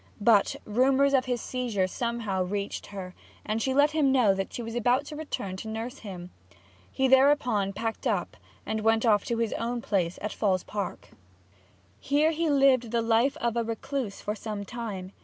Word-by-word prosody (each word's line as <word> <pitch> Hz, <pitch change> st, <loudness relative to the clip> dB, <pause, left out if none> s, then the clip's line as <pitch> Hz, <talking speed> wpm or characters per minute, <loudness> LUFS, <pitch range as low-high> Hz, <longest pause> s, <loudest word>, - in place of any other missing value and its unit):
But 205 Hz, -1 st, +4 dB
rumours 265 Hz, +5 st, +3 dB
of 260 Hz, -2 st, +3 dB
his 245 Hz, -2 st, -2 dB
seizure 240 Hz, -7 st, -1 dB
somehow 225 Hz, -1 st, -2 dB
reached 200 Hz, +2 st, -3 dB
her, 190 Hz, -2 st, -7 dB, 0.3 s
and 220 Hz, +1 st, -1 dB
she 265 Hz, -, 0 dB
let 285 Hz, +3 st, +4 dB
him 300 Hz, -4 st, +2 dB
know 245 Hz, -7 st, +4 dB
that 195 Hz, 0 st, -3 dB
she 240 Hz, -, -5 dB
was 230 Hz, 0 st, -6 dB
about 245 Hz, +4 st, +2 dB
to 300 Hz, -, -8 dB
return 290 Hz, -11 st, -4 dB
to 220 Hz, -, -7 dB
nurse 225 Hz, +4 st, -5 dB
him. 180 Hz, -4 st, -8 dB, 0.6 s
He 265 Hz, -, +1 dB
thereupon 260 Hz, -7 st, +4 dB
packed 225 Hz, +3 st, -3 dB
up -, -, -1 dB, 0.3 s
and 220 Hz, 0 st, -2 dB
went 225 Hz, +1 st, +2 dB
off 210 Hz, -3 st, +3 dB
to 235 Hz, -, -1 dB
his 230 Hz, -2 st, 0 dB
own 240 Hz, +1 st, -2 dB
place 185 Hz, -6 st, -1 dB
at 210 Hz, -, -4 dB
Falls 190 Hz, -4 st, +1 dB
Park. 205 Hz, -3 st, -5 dB, 0.9 s
Here 295 Hz, +3 st, +2 dB
he 330 Hz, 0 st, 0 dB
lived 270 Hz, -4 st, +4 dB
the 230 Hz, 0 st, 0 dB
life 235 Hz, +6 st, +2 dB
of 235 Hz, -5 st, -1 dB
a 235 Hz, -, +1 dB
recluse 230 Hz, -1 st, -4 dB
for 210 Hz, -, -2 dB
some 210 Hz, -1 st, -5 dB
time. 200 Hz, -5 st, -6 dB
230 Hz, 185 wpm, -27 LUFS, 205-260 Hz, 0.9 s, But